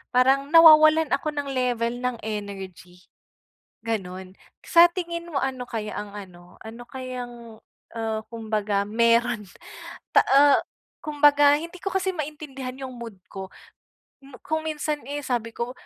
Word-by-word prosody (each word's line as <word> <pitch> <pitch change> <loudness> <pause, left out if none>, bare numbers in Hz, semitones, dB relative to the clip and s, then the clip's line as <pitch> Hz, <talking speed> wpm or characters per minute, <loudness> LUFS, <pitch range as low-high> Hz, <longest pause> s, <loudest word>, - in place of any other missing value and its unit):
parang 270 +2 +3
nawawalan 315 -1 +7
ako 280 - 0
ng 285 -1 -3
level 245 -3 0
ng 250 -2 -1
energy, 195 -4 -7 0.8
gano'n. 185 -4 -4 0.3
Sa 340 0 +7
tingin 340 -1 -5
mo 280 - -2
ano 260 -2 -3
kaya 215 -2 -4
ang 205 -1 -8
ano 180 -3 -12
ano 230 +2 -9
kayang, 245 -4 -8 0.4
ah, 220 -1 -2
kumbaga 215 -3 -1
meron 230 0 +2 0.7
ta - - +8
ah, 280 +1 +6 0.4
kumbaga 290 -1 +4
hindi 335 +3 -9
ko 390 - -1
kasi 385 0 0
maintindihan 280 -4 -6
'yong 260 -1 -7
mood 230 -4 -9 0.2
ko. 190 -1 -7 0.8
Hmm, 270 -2 -13
kung 315 0 -2
minsan 300 -1 -3
eh, 290 0 -4
sabi 230 -2 -2
ko, 240 +1 -3
250 Hz, 135 wpm, -24 LUFS, 220-290 Hz, 0.8 s, ta